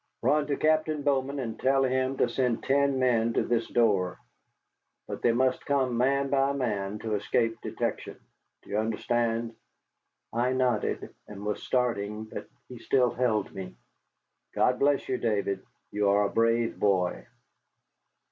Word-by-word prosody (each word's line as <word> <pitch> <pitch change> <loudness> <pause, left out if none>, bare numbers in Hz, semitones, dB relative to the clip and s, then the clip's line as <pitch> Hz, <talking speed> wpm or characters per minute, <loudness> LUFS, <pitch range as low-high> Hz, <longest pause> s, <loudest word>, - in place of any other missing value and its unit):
"Run 150 -1 +2
to 145 - -1
Captain 155 -1 +1
Bowman 140 0 0
and 115 -5 -4
tell 135 +1 +3
him 130 +1 0
to - - +3
send 125 -3 -1
ten 140 0 +2
men 115 -3 +2
to - - +1
this 115 -1 0
door. 100 -7 +2 0.9
But - - -6
they 120 - +4
must 130 +2 +1
come 130 -3 +1
man 135 +3 +1
by 135 0 +2
man, 105 -7 -2
to 110 -1 -2
escape 115 +2 0
detection. - - -4 0.4
Do - - -14
you 105 - +1
understand?" 115 +1 -1 0.8
I 120 +2 +1
nodded 130 -1 0
and 105 0 -9
was 105 -1 -2
starting, 110 -4 -1
but 110 - -8 0.2
he 125 -2 -10
still 125 +1 +2
held 115 -5 0
me. 95 -1 -7 0.8
"God 125 0 +2
bless 140 0 +2
you, 130 - -1
Davy, 100 -4 0 0.3
you 105 -1 +1
are 100 +1 +4
a - - 0
brave 115 0 +1
boy." 95 -3 +1
120 Hz, 150 wpm, -28 LUFS, 110-130 Hz, 0.9 s, they